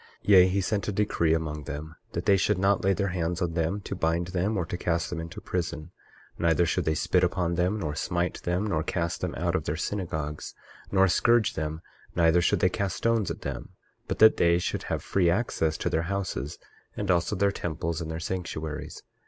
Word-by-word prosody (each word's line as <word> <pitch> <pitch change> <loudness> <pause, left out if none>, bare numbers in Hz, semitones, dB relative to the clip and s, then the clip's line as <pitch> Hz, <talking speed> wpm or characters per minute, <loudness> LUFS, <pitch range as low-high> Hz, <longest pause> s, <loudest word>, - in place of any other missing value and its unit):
23:2 - - -6
Yea, 95 -2 +8
he 95 +1 +1
sent 100 +2 -1
a - - 0
decree 95 -5 +1
among 75 -2 -4
them, 80 +2 -6 0.2
that - - -3
they 100 -2 +5
should 95 +1 +2
not 100 +1 +2
lay 95 - +3
their 100 +1 0
hands 90 -1 -2
on 85 -3 -1
them 85 +4 0
to 100 - -6
bind 85 -1 0
them, 95 +4 0
or 90 - 0
to 85 - -4
cast 85 -1 -1
them 85 - -3
into 85 +2 -7
prison; 85 -2 -4 0.5
neither 85 0 +3
should 80 - 0
they 80 - +1
spit - - +2
upon 85 -1 +1
them, 90 +4 +1
nor 75 -5 -2
smite 85 +3 -2
them, 90 +4 -1
nor 85 -7 0
cast 85 +1 -2
them - - -2
out - - 0
of - - -1
their 75 - -1
synagogues, 80 -5 -4 0.4
nor 95 0 +5
scourge 115 +4 +3
them; 80 +1 -4 0.3
neither 85 0 +4
should 85 - +2
they 95 - +5
cast 95 +1 -2
stones 115 -3 +1
at - - -5
them, - - -6 0.3
but - - -2
that 110 0 +7
they 85 0 +4
should 90 - -2
have - - -2
free 90 -3 +2
access 85 -5 0
to - - -2
their 80 - +1
houses, 90 -7 -3 0.4
and 100 -2 0
also 85 +3 +1
their 100 +1 +2
temples, 85 -2 -3
and 80 - -4
their 80 0 -4
sanctuaries. 80 -3 -5
85 Hz, 215 wpm, -27 LUFS, 80-95 Hz, 0.5 s, Yea